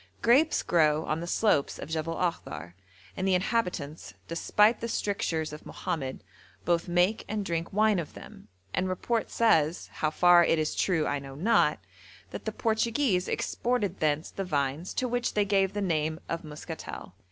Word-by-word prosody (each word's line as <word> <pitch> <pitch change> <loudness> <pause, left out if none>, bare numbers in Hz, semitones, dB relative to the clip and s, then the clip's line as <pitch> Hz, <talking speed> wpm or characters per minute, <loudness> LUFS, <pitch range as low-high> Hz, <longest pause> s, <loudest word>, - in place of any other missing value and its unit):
Grapes 280 +7 +4
grow 155 -2 +3
on 155 - -1
the 170 - -5
slopes 175 -7 +1
of - - -7
Jebel 160 +1 -2
Akhdar, 170 - -3 0.4
and 185 - -1
the 190 - +4
inhabitants, 180 -7 -2
despite 210 +6 +2
the 230 - -2
strictures 165 -8 -1
of 150 - -9
Mohammed, 135 -5 -4 0.4
both 170 -1 +1
make 180 +5 +2
and 210 -1 -2
drink 170 -1 -2
wine 210 -1 +3
of 165 - -6
them, - - -12 0.3
and 185 +1 0
report 225 +5 -1
says 165 -8 +2
(how 155 - 0
far 175 +2 +6
it 165 - +2
is 155 -1 0
true 165 -5 +1
I 145 - -1
know 135 -1 -9
not) 180 -2 +3 0.5
that - - -7
the 220 - -1
Portuguese 220 -2 +1
exported 225 -6 -1
thence 155 0 0
the 195 - -4
vines 145 0 -2
to 255 - 0
which 245 0 -1
they 205 -1 +3
gave 195 -1 +2
the 205 - -2
name 160 -4 0
of 165 0 -3
muscatel. 150 -1 -8
175 Hz, 170 wpm, -28 LUFS, 155-210 Hz, 0.5 s, far